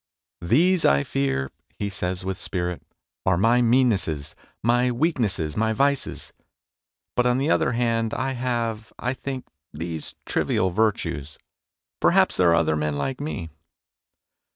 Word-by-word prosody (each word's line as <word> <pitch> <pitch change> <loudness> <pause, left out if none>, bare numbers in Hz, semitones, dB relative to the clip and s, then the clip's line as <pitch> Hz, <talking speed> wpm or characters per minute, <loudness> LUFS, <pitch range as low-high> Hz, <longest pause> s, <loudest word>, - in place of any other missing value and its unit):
" - - -68
These 180 +4 +4
I 70 0 +4
fear," 65 -1 -1 0.3
he 100 - -2
says 90 0 -3
with 95 0 -2
spirit, 90 -2 -3 0.2
" - - -69
are 95 -2 +4
my 115 +6 +4
meannesses, 115 - +2 0.3
my 120 +2 +3
weaknesses, 120 - 0
my 110 +1 +1
vices; 140 +4 0 0.8
but, 125 0 +3
on 125 0 +2
the 140 +4 +1
other 120 - +2
hand, 115 -2 0
I 130 +1 -1
have, 120 -3 -2
I 125 +1 -1
think, 130 -1 -5 0.3
these 80 0 -4
trivial 95 0 +1
virtues. 85 -8 -1 0.6
Perhaps - - +4
there 90 -2 +5
are 85 - +5
other 80 -2 +2
men 75 -1 -1
like 130 - -3
me 85 - -4
110 Hz, 145 wpm, -24 LUFS, 85-125 Hz, 0.8 s, there